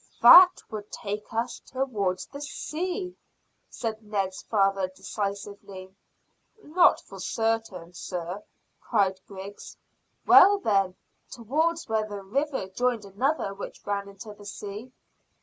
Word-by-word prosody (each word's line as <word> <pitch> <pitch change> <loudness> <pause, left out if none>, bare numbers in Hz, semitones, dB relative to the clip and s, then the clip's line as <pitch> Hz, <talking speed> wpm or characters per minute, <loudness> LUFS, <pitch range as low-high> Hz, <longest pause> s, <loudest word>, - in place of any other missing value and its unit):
"That 360 0 +9
would 210 -1 -7
take 210 0 -5
us 230 +2 -2
towards 215 -9 -2
the 280 +1 -10
sea," 360 +5 -4 0.5
said 225 -2 -4
Ned's 195 -3 -3
father 195 -3 +1
decisively. 195 -1 -6 0.7
"Not 345 +4 +4
for - - -12
certain, 225 -6 -2
sir," 180 +2 -5 0.4
cried 195 -4 +1
Griggs. 200 +1 -10 0.5
"Well, 405 +2 +8
then, 195 - +1 0.3
towards 315 +8 -1
where 220 -1 -1
the 200 -1 -6
river 270 +1 -2
joined 240 +1 -1
another 205 +2 -1
which 200 - -9
ran 200 -1 -2
into 210 +2 -10
the 205 0 -15
sea." 205 +4 -7
210 Hz, 115 wpm, -27 LUFS, 195-250 Hz, 0.7 s, That